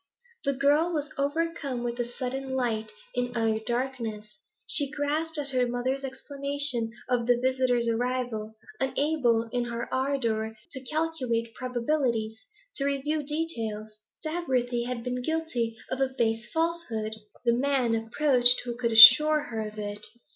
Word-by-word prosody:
The 280 - +2
girl 290 +5 +2
was 300 -2 -3
overcome 285 -3 -2
with 240 0 -3
a 240 - 0
sudden 265 +1 -4
light 220 -4 -1 0.2
in 245 -1 -2
utter 225 -1 +1
darkness. 230 -3 -4 0.3
She 285 -3 +3
grasped 305 +2 -2
at 285 -1 -3
her 255 -2 +1
mother's 255 +3 -2
explanation 280 -2 -1 0.2
of 245 -2 0
the 245 -1 +4
visitor's 255 -2 +1
arrival; 230 -2 -2 0.2
unable, 270 -4 +1
in 245 -1 -1
her 235 0 -4
ardour, 230 -5 -1
to 265 - -6
calculate 255 -8 -2
probabilities, 240 -3 -1 0.3
to 275 - 0
review 280 +2 -1
details. 225 -9 -4 0.2
Dagworthy 255 -7 -1
had 250 -2 -4
been 250 0 -3
guilty 250 -7 -2
of 260 +1 -2
a 265 - +2
base 225 0 0
falsehood; 320 -11 -2 0.3
the 235 - +4
man 255 -2 +1
approached 245 +2 +3
who 240 -1 -4
could 235 -1 -1
assure 300 +7 +10
her 220 -1 -3
of 210 0 -11
it. 205 0 -5
250 Hz, 140 wpm, -27 LUFS, 230-280 Hz, 0.3 s, assure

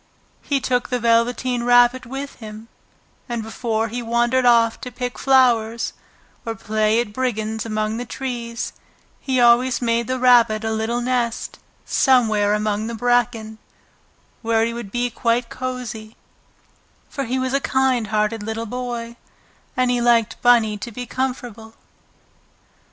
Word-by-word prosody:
He 280 -1 0
took 250 -1 -1
the 250 - 0
Velveteen 240 +1 +1
Rabbit 245 +1 +4
with 275 +3 -6
him, 220 0 -10 0.6
and 235 -2 -3
before 225 0 -2
he 245 +3 -4
wandered 240 +2 +1
off 230 -1 +4
to 250 - -6
pick 245 +1 -5
flowers, 235 -4 +2 0.5
or 225 -1 -4
play 215 +1 +1
at 235 -3 -3
brigands 220 -3 -2
among 215 0 -2
the 245 - -4
trees, 240 -1 -5 0.5
he 260 -2 -1
always 245 +1 +4
made 235 -1 0
the 255 0 -1
Rabbit 240 -4 +4
a 220 - -1
little 220 +2 -1
nest 245 -2 -2 0.3
somewhere 215 -6 +3
among 210 0 -1
the 230 - -4
bracken, 230 -2 0 0.8
where 225 -1 +2
he 230 - -3
would 235 -4 -7
be 245 +1 -1
quite 235 +1 0
cosy, 240 -4 -6 0.9
for 275 -2 -4
he 250 +2 -2
was 260 0 -1
a 275 - +1
kind 260 -5 +1
hearted 215 +1 0
little 220 +2 -4
boy 235 0 -5 0.6
and 255 -1 +2
he 245 -1 0
liked 235 -2 +2
Bunny 225 -4 +4
to 235 - -6
be 245 +3 -6
comfortable. 245 -4 -5
235 Hz, 145 wpm, -21 LUFS, 220-250 Hz, 0.9 s, Rabbit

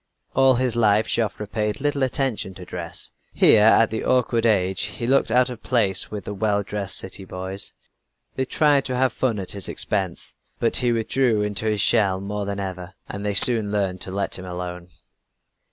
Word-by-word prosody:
All 135 -1 +4
his 125 -1 0
life 110 -2 +3
Joffre 105 -2 -2
paid 105 +2 -3
little 145 0 -1
attention 130 -7 -1
to 90 - -10
dress. 85 -2 -6 0.2
Here 110 - +6
at 110 +1 +5
the 110 - -3
awkward 120 -2 +1
age 95 -3 +1
he 120 - -4
looked 135 0 +2
out 125 +2 +2
of 120 - -9
place 110 -7 +1
with 105 -3 -7
the 105 - -5
well 100 0 0
dressed 100 -1 -2
city 95 +1 -4
boys. 95 +1 -6 0.6
They 130 - -1
tried 145 0 +2
to 130 - -3
have 130 -2 +1
fun 120 -5 -1
at 95 -2 -4
his 100 -2 -2
expense, 95 -5 -2 0.2
but - - +2
he 120 -1 +1
withdrew 115 -1 +1
into 105 +1 -2
his 105 -2 +1
shell 100 -5 +3
more 100 +1 -4
than 100 0 -4
ever, 95 -1 -6
and 100 +1 -7
they 105 -1 -2
soon 110 -1 +6
learned 95 -3 -2
to - - -3
let 100 0 -2
him 95 - -8
alone. 90 -1 -7
105 Hz, 190 wpm, -22 LUFS, 95-120 Hz, 0.6 s, Here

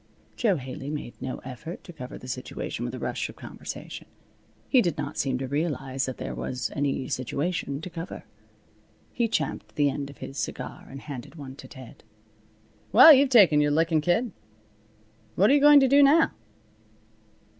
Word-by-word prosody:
Jo 215 -6 +2
Haley 135 +1 -7
made 145 -5 -5
no 130 - -4
effort 150 +7 -8
to 175 - -11
cover 125 -5 -8
the 125 - -11
situation 125 0 -5
with - - -4
a - - -6
rush - - -3
of - - -11
conversation. - - -9 0.6
He 255 - +5
did 175 -7 -1
not 145 0 -4
seem 135 -2 0
to 130 +1 -4
realize 135 -2 -2
that 130 - -5
there 130 - -5
was 125 -3 -4
any 140 -2 -1
situation 140 +3 -3
to 185 - -7
cover. 170 +2 -7 0.9
He 235 -1 +1
champed 155 -9 -3
the 145 -1 +2
end 140 0 -5
of 140 - -13
his 135 - -7
cigar - - -6
and 135 0 -9
handed 140 0 -8
one 135 -4 -9
to - - -11
Ted. 130 -4 -13 0.9
"Well, 260 +8 +10
you've 275 0 +4
taken 190 - +6
your 145 - +2
lickin', 160 +1 +2
kid. 180 +9 +1 1.0
What 200 +7 +4
you 290 - +5
going 295 0 +8
to 270 - +4
do 280 +2 +5
now?" 295 +4 +5
150 Hz, 175 wpm, -26 LUFS, 135-185 Hz, 1.0 s, Well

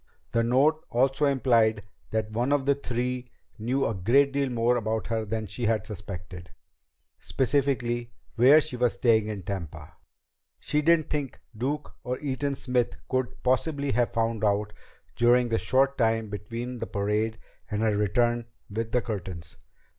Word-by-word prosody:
The 115 - +2
note 140 +7 +3
also 135 +4 +2
implied 115 -6 +3 0.3
that 110 -1 -2
one 120 +5 0
of 145 -2 +2
the 140 - +4
three 125 -2 -3 0.3
knew 130 +5 0
a - - 0
great 130 +9 +3
deal 140 -1 0
more 120 0 +2
about 110 -3 -1
her 110 +2 -2
than 110 +1 -3
she 120 +3 -4
had 110 -1 +1
suspected 90 -3 -8 0.7
specifically 120 -3 0 0.2
where 130 +6 +7
she 155 -4 -5
was 120 -1 +2
staying 110 -3 +3
in 105 -3 -5
Tampa. 95 -5 -6 0.7
She 150 - 0
didn't 160 0 +3
think 145 -4 -3 0.2
Duke 140 +6 -3
or 125 +1 -2
Eaton 140 0 -2
Smith 125 -2 0
could 130 -1 -2
possibly 140 +2 +1
have 120 0 +1
found 115 -1 -1
out 105 0 +1 0.4
during 120 +1 +4
the 115 - +1
short 135 +9 +2
time 115 -2 +1
between 115 +4 -5
the - - -4
parade 105 +2 -1 0.3
and 105 0 -1
her 110 -2 +2
return 120 +3 +1 0.2
with 115 +2 -3
the 125 - +2
Curtins. 90 -7 -6
120 Hz, 155 wpm, -27 LUFS, 110-130 Hz, 0.7 s, where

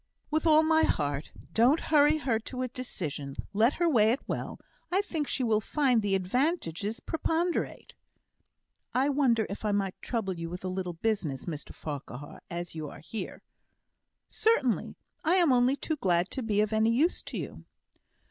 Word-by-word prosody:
"With 315 +2 +1
all 310 0 +6
my 320 0 +4
heart. 145 - 0 0.2
Don't 250 +8 +5
hurry 300 0 +6
her 245 -7 0
to 255 +3 -5
a - - -1
decision. 160 - -5 0.2
Let 225 +7 +4
her 345 - +1
weigh 225 -9 +5
it 250 +5 -1
well. - - -4 0.3
I 380 +3 +3
think 320 -7 -3
she 260 - -1
will 220 -2 +2
find 255 -1 +2
the 200 -2 +1
advantages 210 - -1
preponderate." 330 +2 -2 1.0
"I 265 +3 +3
wonder 255 -6 +3
if 200 - -7
I 210 - +1
might 195 -2 -1
trouble 220 -6 -2
you 165 -1 -5
with 180 +2 -6
a - - -1
little 185 -1 -3
business, 165 - -2
Mr 155 -4 -5
Farquhar, 145 -2 -7
as 175 0 -4
you 155 -2 -5
are - - -11
here?" 215 +7 -6 0.8
"Certainly; 290 - +1 0.3
I 340 +2 +3
am 345 -6 +4
only 250 +2 +4
too 310 +2 -3
glad 180 -6 +1
to 265 - -2
be 210 -3 +1
of 215 +1 0
any 220 +1 +3
use 290 +10 +2
to - - -6
you." - - -6
225 Hz, 175 wpm, -29 LUFS, 185-290 Hz, 1.0 s, all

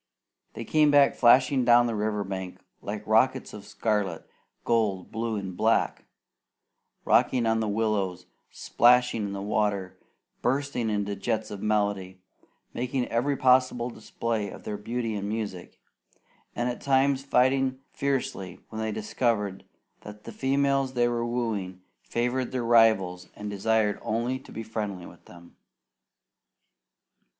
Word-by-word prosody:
They 115 - -6
came 150 +3 +3 0.2
flashing 130 +2 +4
down 120 0 +6
the 120 - -1
river 105 -1 -1
bank, 95 -1 -6 0.2
like 105 +1 -6
rockets 130 +4 +2
of 105 -1 -10
scarlet, 105 -6 -2 0.4
gold, 105 -6 0
blue, 115 0 -2
and 95 -3 -5
black; 110 +4 +1 1.0
rocking 125 -3 +3
on 115 0 +2
the 110 - -1
willows, 100 -4 -1 0.2
splashing 120 -3 +3
in 100 - -5
the 100 0 -5
water, 100 -3 -1 0.4
bursting 130 -2 -1
into 105 -1 -1
jets 110 0 -2
of 100 -1 -7
melody, 100 -3 -1 0.5
making 125 +1 -2
every 135 +4 0
possible 125 -1 +3
display 115 -3 -3
of - - -11
their 105 - -4
beauty 115 +2 -3
and 100 -1 -3
music; 105 -5 -5 0.8
and 120 - -1
at 125 - -4
times 135 0 +2
fighting 130 0 +2 0.2
fiercely 125 -10 -2
when 110 0 -5
they 110 0 -2
discovered 105 -2 -1 0.3
that 105 0 -12
the - - -8
females 135 0 +1
they 120 -1 +2
were 120 -1 -1
wooing 110 -6 -3 0.2
favoured 125 +2 -2
their 125 -2 -2
rivals 110 -6 +3
and 105 0 -6
desired 105 +1 +1
only 120 +4 -2
to - - -16
be 115 - -6
friendly 105 -5 -5
with 85 - -15
them. 85 -1 -16
110 Hz, 135 wpm, -27 LUFS, 100-125 Hz, 1.0 s, down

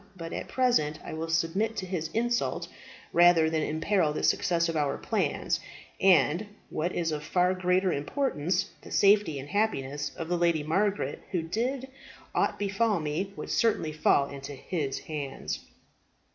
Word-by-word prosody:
But, 165 -1 -6
at - - -4
present, 240 - +2
I - - -6
will 160 +1 -3
submit 180 +7 0
to 190 - -2
his 180 -4 -3
insult 235 +1 0 0.5
rather 170 -2 +6
than 160 -1 +1
imperil 160 +1 +1
the - - -3
success 170 -1 +2
of 165 - -2
our 145 -2 0
plans, - - -1 0.4
and, 175 - +4 0.2
what 170 +3 -1
is 165 -2 0
of 150 -1 -3
far 180 +3 +2
greater 185 0 +2
importance, 175 - -1
the - - -12
safety 200 -6 +4
and 135 +1 -7
happiness 145 -9 -1
of 165 - -5
the 175 0 0
Lady 170 -3 +2
Margaret, 195 +6 0
who, 175 -3 -1
did 245 +10 -2 0.5
aught - - +1
befall 205 0 +1
me, 155 +6 -2
would - - -7
assuredly 215 -9 +1
fall 145 -2 +3
into 140 0 -7
his 140 0 -3
hands." 145 -3 -4
170 Hz, 160 wpm, -28 LUFS, 155-195 Hz, 0.5 s, rather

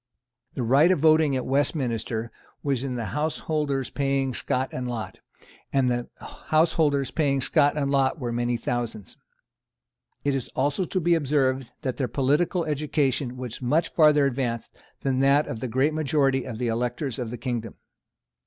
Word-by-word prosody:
The 130 - -2
right 135 +8 +5
of 185 - +4
voting 155 -1 +4
at 130 - -2
Westminster 120 -5 -1 0.3
was 135 -3 0
in 130 -2 -3
the 115 -2 -3
householders 150 -3 -1
paying 135 -2 0
scot 130 +2 -1
and 125 0 -4
lot; 110 -6 -5 0.5
and 130 -2 +2
the 120 0 -2
householders 155 -4 +1
paying 140 -4 +1
scot 145 +2 +2
and 140 -2 0
lot 135 +2 +2
were 125 -5 -3
many 120 0 0
thousands. 115 -4 -4 1.1
It 140 - +1
is 135 -3 -2
also 145 +7 +1
to 185 - -1
be 170 0 +2
observed 135 -5 +1
that 130 -3 -2
their 130 - 0
political 145 - +1
education 145 -4 -1
was 125 -1 -6
much 150 +7 +1
further 150 -3 +5
advanced 120 -3 -2 0.3
than 130 -1 0
that 140 +2 +4
of 115 - -5
the 130 - -3
great 130 +6 +1
majority 140 -3 +1
of 120 -4 -6
the 125 +1 -1
electors 120 +3 -2
of 120 -3 -3
the 120 - -5
kingdom. 120 -4 -4
135 Hz, 165 wpm, -25 LUFS, 125-150 Hz, 1.1 s, right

